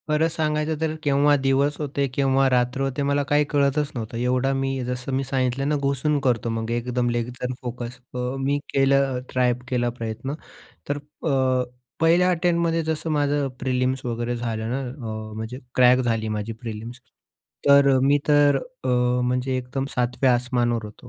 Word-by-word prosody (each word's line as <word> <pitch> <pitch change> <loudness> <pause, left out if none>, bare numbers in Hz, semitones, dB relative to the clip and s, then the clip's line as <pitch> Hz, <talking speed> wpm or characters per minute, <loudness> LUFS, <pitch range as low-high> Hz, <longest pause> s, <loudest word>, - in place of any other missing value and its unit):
खरंच 155 +2 +2
सांगायचं 155 -1 0
तर, 160 -1 0
केव्हा 145 +1 +4
दिवस 135 +2 +2
होते, 140 -2 -1
केव्हा 135 0 +3
रात्र 125 +1 +1
होते, 135 +1 -1
मला 140 0 +1
काही 145 +1 +2
कळतच 145 +1 +1
नव्हतं. 115 -1 -5
एवढा 125 +2 +1
मी, 135 -1 -1
जसं 125 +2 -4
मी 135 - 0
सांगितलं 135 0 -1
ना, 150 - +2
घुसून 140 +2 +1
करतो 120 -4 0
मग 115 0 -3
एकदम 120 +1 0
लेग्जर 120 +2 -3
फोकस. 125 0 -6
अ, - - -5 0.2
मी 140 +2 0
केलं 135 -1 +3
ट्राय 125 -1 +3
केला 120 -1 0
प्रयत्न, 115 +4 -4 0.6
तर 145 - 0 0.3
अ, 130 -2 +2 0.4
पहिल्या 170 +3 +4
अटेम्प्टमध्ये 170 -1 +1
जसं 160 +1 -2
माझं 145 -2 +1
प्रिलिम्स 130 0 -1
वगैरे 120 0 -2
झालं 115 -2 -3
ना, 130 +3 -1
अ, 115 -5 -6
म्हणजे 110 +3 -5 0.2
क्रॅक 125 0 +6
झाली 115 -3 0
माझी 105 +1 -3
प्रिलिम्स. 115 +2 -8 0.7
तर 140 0 +7
अ, - - +3
मी 140 +2 +4
तर 145 -1 +5 0.3
अ, - - -1 0.4
म्हणजे 125 +1 0
एकदम 130 +1 -3
सातव्या 125 +1 +2
आसमानावर 120 -2 0
होतो, 105 +3 -11
130 Hz, 160 wpm, -24 LUFS, 120-140 Hz, 0.7 s, तर